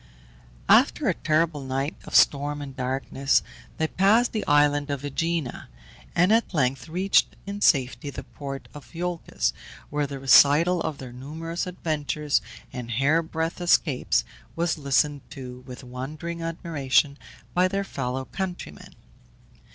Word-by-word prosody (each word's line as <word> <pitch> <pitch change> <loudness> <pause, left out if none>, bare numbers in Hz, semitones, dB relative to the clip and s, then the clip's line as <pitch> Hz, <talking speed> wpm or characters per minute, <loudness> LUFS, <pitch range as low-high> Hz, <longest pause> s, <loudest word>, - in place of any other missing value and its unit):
After - - +4
a - - +3
terrible 155 -1 0
night 135 +3 -2
of - - -6
storm 145 +1 +4
and 140 -2 -7
darkness 135 +1 0 0.3
they 160 - +1
passed 205 +9 +3
the 215 - -1
island 145 -1 +3
of 140 -1 -3
Ægina, 155 -1 -2 0.5
and 180 +4 +4
at 225 -5 +1
length 130 -1 0
reached 185 +4 +2
in 200 +1 -6
safety 140 -1 +2
the - - -7
port 135 -1 -8
of 145 +3 -12
Iolcus, 175 0 -2 0.4
where 145 0 0
the 140 0 -6
recital 145 +7 +5
of 155 -3 -3
their 130 -3 -9
numerous 160 +7 -5
adventures 150 -4 -1 0.3
and 125 -2 -6
hair 140 +8 +2
breadth 165 +1 -3
escapes 165 -6 +2 0.3
was 170 0 0
listened 145 -1 +1
to 125 -2 -8
with 125 +1 -9
wondering 150 +7 -6
admiration 150 -4 0 0.3
by 180 +1 +4
their 195 +1 -1
fellow 130 -6 -4
countrymen. 180 - -6
145 Hz, 135 wpm, -25 LUFS, 135-170 Hz, 0.5 s, recital